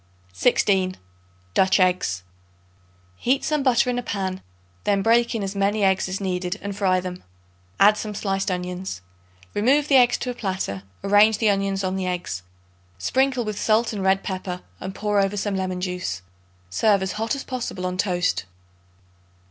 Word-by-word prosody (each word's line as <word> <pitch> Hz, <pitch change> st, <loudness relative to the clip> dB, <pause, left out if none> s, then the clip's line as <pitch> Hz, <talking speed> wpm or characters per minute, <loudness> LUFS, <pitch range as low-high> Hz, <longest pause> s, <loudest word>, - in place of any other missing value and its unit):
16. 185 Hz, -, +2 dB, 0.6 s
Dutch 190 Hz, +1 st, +4 dB
Eggs. 180 Hz, -, +1 dB, 0.9 s
Heat 265 Hz, -, +1 dB
some 300 Hz, -1 st, +1 dB
butter 250 Hz, -3 st, +3 dB
in 245 Hz, 0 st, 0 dB
a -, -, -2 dB
pan; 190 Hz, -4 st, -3 dB, 0.4 s
then 200 Hz, -1 st, +1 dB
break 235 Hz, +2 st, +3 dB
in 215 Hz, -, -1 dB
as 195 Hz, +1 st, -4 dB
many 200 Hz, +1 st, +1 dB
eggs 190 Hz, -1 st, +2 dB
as 185 Hz, -, -3 dB
needed 180 Hz, 0 st, -2 dB
and 200 Hz, 0 st, -4 dB
fry 190 Hz, -2 st, +2 dB
them; 180 Hz, 0 st, -6 dB, 0.6 s
add 210 Hz, +2 st, +6 dB
some 210 Hz, -1 st, -5 dB
sliced 195 Hz, -1 st, -1 dB
onions. 180 Hz, -, -4 dB, 0.5 s
Remove 275 Hz, +7 st, +3 dB
the 275 Hz, -, +6 dB
eggs 245 Hz, -1 st, +5 dB
to 250 Hz, -, -3 dB
a -, -, -5 dB
platter; 190 Hz, -, -3 dB, 0.2 s
arrange 205 Hz, +2 st, +5 dB
the 215 Hz, -2 st, +3 dB
onions 195 Hz, 0 st, -1 dB
on 185 Hz, 0 st, -1 dB
the 185 Hz, -1 st, -2 dB
eggs; 175 Hz, -, -3 dB, 0.6 s
sprinkle 255 Hz, -, +1 dB
with 215 Hz, -1 st, -4 dB
salt 220 Hz, +1 st, +2 dB
and 205 Hz, -, -3 dB
red 190 Hz, 0 st, +2 dB
pepper 185 Hz, -1 st, -4 dB, 0.2 s
and 190 Hz, 0 st, -6 dB
pour 210 Hz, -1 st, +1 dB
over 195 Hz, +1 st, +1 dB
some 205 Hz, 0 st, -1 dB
lemon 185 Hz, -1 st, -2 dB
juice. 180 Hz, -, -3 dB, 0.5 s
Serve 200 Hz, -, +3 dB
as 190 Hz, -, -2 dB
hot 225 Hz, +4 st, -1 dB
as 275 Hz, -, -5 dB
possible 240 Hz, -7 st, -4 dB
on 180 Hz, 0 st, -2 dB
toast. 180 Hz, -, 0 dB
195 Hz, 170 wpm, -23 LUFS, 185-215 Hz, 0.9 s, add